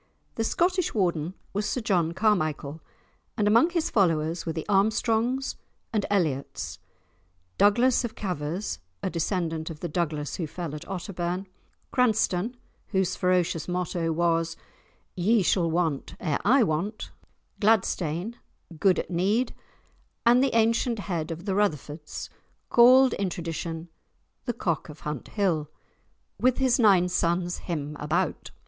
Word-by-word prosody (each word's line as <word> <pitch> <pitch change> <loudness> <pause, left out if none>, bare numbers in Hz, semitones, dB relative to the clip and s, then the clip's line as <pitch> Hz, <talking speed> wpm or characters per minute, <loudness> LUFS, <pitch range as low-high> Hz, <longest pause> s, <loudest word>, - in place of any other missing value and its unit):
The 225 - -1
Scottish 360 +7 +1
Warden 175 -3 0 0.2
was 205 +1 -1
Sir 250 - -1
John 175 -7 +1
Carmichael, 155 -7 0 0.6
and 210 - +2
among 230 +10 +5
his 335 -2 -1
following 165 -6 +2
were - - +1
the 160 -1 -4
Armstrongs 225 +5 +1 0.4
and 210 -2 0
Elliots, 135 - -1 0.8
Douglas 240 +5 +4
of 235 - -4
Cavers 180 - -3 0.2
(a 185 - -1
descendant 165 -2 -1
of 160 -2 -8
the 175 - -2
Douglas 150 -3 -2
who 165 - -2
fell 165 -1 -5
at 150 +3 -7
Otterbourne), 180 -1 -3 0.5
Cranstoun, 225 -2 +1 0.3
whose 190 -2 0
ferocious 180 -3 +1
motto 175 -2 -1
was 165 0 +1 0.6
"Ye 205 +3 +3
shall 175 -1 +2
want 160 -4 -1
ere 150 -4 -1
I 245 +7 +5
want," 195 +5 -2 0.5
Gladstain, 200 -2 +1 0.4
"good 190 0 +4
at - - -3
need," 205 +8 +1 0.7
and 245 +2 +6
the 270 -4 +1
ancient 230 +1 +2
head 175 -6 -3
of 165 +2 -6
the 195 - 0
Rutherfoords, 155 -6 -2 0.4
called 255 +1 +7
in 195 -2 -1
tradition 165 -1 -5 0.6
the 240 - -1
Cock 170 -10 -2
of 150 0 -11
Hunthill, 155 - -1 0.7
"with 255 0 +3
his 260 -1 +3
nine 195 -6 +5
sons 175 0 0
him 150 -4 -4
about." 165 +5 -1
180 Hz, 130 wpm, -27 LUFS, 165-220 Hz, 0.8 s, called